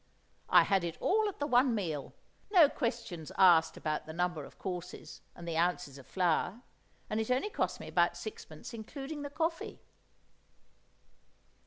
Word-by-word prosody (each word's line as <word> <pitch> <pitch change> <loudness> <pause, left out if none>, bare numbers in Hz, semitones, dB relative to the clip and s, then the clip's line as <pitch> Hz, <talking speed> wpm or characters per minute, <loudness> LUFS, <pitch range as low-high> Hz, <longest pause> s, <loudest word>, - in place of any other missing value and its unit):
I - - +7
had 195 -3 +2
it 170 -1 -4
all 430 +2 +2
at 400 - -9
the 290 - -1
one 250 -2 +4
meal, 160 -9 -3 0.3
no 350 -8 +7
questions 180 - -4
asked 175 -4 +6
about 155 -1 -3
the 160 - -6
number 175 -2 -1
of - - -15
courses 180 -3 -6
and 170 - -10
the 165 - -2
ounces 170 -5 0
of 130 - -15
flour, 185 +5 0 0.4
and 215 - -1
it 220 - -2
only 260 +12 +1
cost - - -1
me - - -8
about - - +2
sixpence 435 - -8
including 275 +6 -6
the 285 - -5
coffee. 325 +3 -2
195 Hz, 160 wpm, -32 LUFS, 170-280 Hz, 0.4 s, I